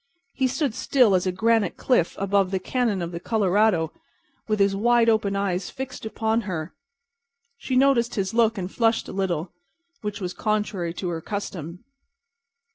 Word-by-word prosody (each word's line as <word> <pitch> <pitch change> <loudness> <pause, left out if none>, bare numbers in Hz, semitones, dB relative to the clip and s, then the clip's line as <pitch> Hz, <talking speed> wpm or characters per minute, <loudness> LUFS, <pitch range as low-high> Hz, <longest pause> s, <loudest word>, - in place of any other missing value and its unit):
He 265 - +1
stood 265 -1 -1
still 250 -3 +3
as 185 0 +2
a - - +2
granite 220 +1 +1
cliff 240 -10 +1
above 195 -1 +1
the 190 0 -1
cañon 215 -2 -1
of 170 - -4
the 170 - -5
Colorado, 200 -5 +2 0.5
with 215 -1 +1
his 200 0 +3
wide 235 +2 +3
open 215 -3 +1
eyes 190 -2 -1
fixed 260 -4 -6
upon 220 +1 0
her. 170 -6 -5 0.8
She 265 -2 -3
noticed 255 -3 +3
his 195 -2 -1
look 230 -1 +3
and 185 0 -4
flushed 225 -1 +1
a - - -7
little, 180 -3 -2 0.5
which 210 -1 -4
was 180 -2 -4
contrary 205 -5 -2
to 180 - -3
her 165 -1 -3
custom. 180 -3 -6
205 Hz, 165 wpm, -24 LUFS, 185-230 Hz, 0.8 s, still